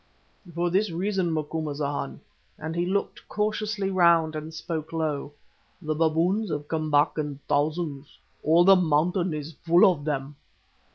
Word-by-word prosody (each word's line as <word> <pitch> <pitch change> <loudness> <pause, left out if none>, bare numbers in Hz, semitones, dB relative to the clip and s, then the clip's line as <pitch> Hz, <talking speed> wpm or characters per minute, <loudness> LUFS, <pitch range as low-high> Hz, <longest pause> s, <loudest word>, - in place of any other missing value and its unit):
"For 175 0 0
this 200 +3 +2
reason, 185 +1 -1
Macumazahn," 150 - -3 0.4
and 160 +1 -5
he 175 +1 0
looked 200 +2 -3
cautiously 210 -1 -1
round 170 -4 +4
and 155 +1 -5
spoke 160 -1 -5
low. 155 -3 -2 0.5
"The 155 -3 -2
baboons 165 +7 +1
have 150 -1 -4
come 155 -1 -2
back 145 +1 +2
in 145 -2 -4
thousands. 150 -1 -1 0.2
All 165 +3 +4
the 195 +2 +7
mountain 175 +1 +1
is 155 +1 -5
full 170 +1 +6
of 175 -6 +2
them." 140 -1 -3
160 Hz, 145 wpm, -26 LUFS, 150-180 Hz, 0.5 s, the